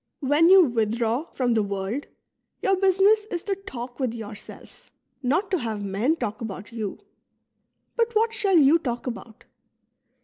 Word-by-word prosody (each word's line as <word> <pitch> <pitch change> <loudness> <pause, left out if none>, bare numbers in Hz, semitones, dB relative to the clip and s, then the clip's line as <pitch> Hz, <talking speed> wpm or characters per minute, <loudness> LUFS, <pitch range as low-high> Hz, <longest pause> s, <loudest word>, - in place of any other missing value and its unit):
When 295 +5 +4
you 380 0 +8
withdraw 230 +1 0
from 245 -2 0
the 220 - +2
world, 200 +6 -3 0.6
your 390 - +3
business 390 +3 +3
is 355 -5 -5
to 405 - -1
talk 255 -11 -8
with 250 -4 -1
yourself, 215 -2 -11 0.3
not 320 +10 0
to 370 - +1
have 220 -4 -4
men 205 +10 0
talk 215 -9 -4
about 205 -1 -7
you. 220 -4 -4 1.0
But 470 -1 0
what 450 +1 +2
shall 395 -4 +2
you 305 +2 +6
talk 245 -6 -4
about 235 -3 -8
255 Hz, 150 wpm, -25 LUFS, 225-370 Hz, 1.0 s, you